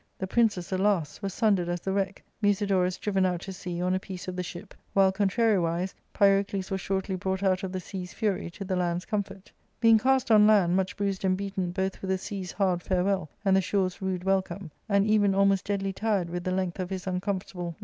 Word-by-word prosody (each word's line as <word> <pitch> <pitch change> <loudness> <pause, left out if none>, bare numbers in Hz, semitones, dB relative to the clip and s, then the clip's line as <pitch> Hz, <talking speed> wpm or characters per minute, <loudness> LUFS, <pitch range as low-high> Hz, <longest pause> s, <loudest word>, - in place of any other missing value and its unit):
The 190 - -3
princes, 205 -4 +1
alas! 190 -4 0
were 195 - -2
sundered 195 -4 +1
as 175 0 -1
the 190 - -2
wreck, 195 0 -2 0.2
Musidorus 195 -3 +2
driven 195 -2 0
out 180 -2 0
to 195 - -6
sea 180 -1 -4
on 180 0 +1
a 185 - +1
piece 185 -1 -8
of 185 - -4
the 180 - -2
ship, 175 -1 -8 0.2
while, 195 -1 +5
contrariwise, 190 -3 +1 0.2
Pyrocles 195 -1 +2
was 190 0 -1
shortly 190 0 -2
brought 190 +1 -2
out 185 -1 +2
of 190 -2 -4
the 185 - -3
sea's 180 -1 -7
fury 205 -6 -1
to 195 +3 -8
the 185 0 -1
land's 175 0 -1
comfort. 200 -2 -4
" - - -42
Being 225 -1 +6
cast 265 +1 +2
on 210 -1 +7
land, 195 -5 +4
much 190 -1 -1
bruised 200 -2 -2
and 185 -1 +2
beaten 195 -2 -3
both 190 +1 -2
with 190 - -4
the 190 - +2
sea's 190 -2 -5
hard 185 -3 +1
farewell 185 -2 0 0.2
and 195 -1 +4
the 190 - +4
shore's 185 0 -1
rude 185 -2 -2
welcome, 190 -2 -1 0.2
and 200 -1 +3
even 205 -2 +3
almost 195 0 +3
deadly 195 -1 -1
tired 200 -4 -1
with 175 0 -4
the - - 0
length 185 -1 -2
of 180 -1 -3
his 190 -1 -5
uncomfortablQ 185 +2 -1
ARCADIA. - - -3
^Book 180 -2 -7
II. 170 - -6
190 Hz, 230 wpm, -27 LUFS, 185-200 Hz, 0.2 s, on